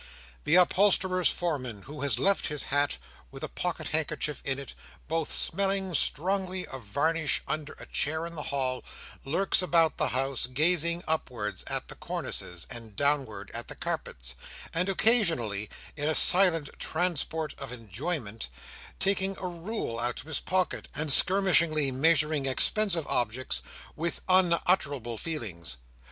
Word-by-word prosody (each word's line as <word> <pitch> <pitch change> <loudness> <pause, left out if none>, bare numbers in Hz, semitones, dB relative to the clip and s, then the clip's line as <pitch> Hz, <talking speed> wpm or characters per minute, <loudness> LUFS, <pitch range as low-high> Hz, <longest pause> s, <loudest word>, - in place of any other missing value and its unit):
The 155 - +3
upholsterer's 185 0 +3
foreman, 130 - -3
who 145 0 -10
has 140 -5 +1
left 195 +10 +2
his 150 -1 -2
hat, 145 - +1 0.3
with - - -11
a - - -2
pocket - - -4
handkerchief 155 -1 -2
in 135 -1 -2
it, 140 - -8 0.3
both 160 -1 -2
smelling 195 0 +1
strongly 185 +4 +1
of 130 - -8
varnish, 145 +8 0
under 155 -1 -4
a - - -12
chair 160 +3 0
in 170 - -8
the 155 - -5
hall, 130 -2 -2 0.4
lurks 180 +9 +2
about 165 -3 +2
the - - +1
house, 135 -1 -1
gazing 170 +5 +2
upwards 115 -11 -2
at - - -3
the - - -8
cornices, 90 -1 -2
and 115 -3 -8
downward 140 -4 -1
at - - -6
the - - -8
carpets, - - -5 0.4
and 180 +4 0
occasionally, 165 - +3 0.3
in 145 +1 -1
a 155 - +2
silent 175 -5 +8
transport 160 -2 -2
of 135 -3 -7
enjoyment, 115 - -4 0.5
taking 195 0 +2
a - - -6
rule 175 - -5
out 120 0 -2
of - - -17
his 160 -2 -3
pocket, 185 -1 -1
and 150 -1 +1
skirmishingly 170 -7 +3
measuring 150 0 +2
expensive 170 +4 0
objects, 120 - -1 0.3
with 165 +2 -3
unutterable 170 - +1
feelings. 90 - -6
155 Hz, 140 wpm, -28 LUFS, 130-175 Hz, 0.5 s, silent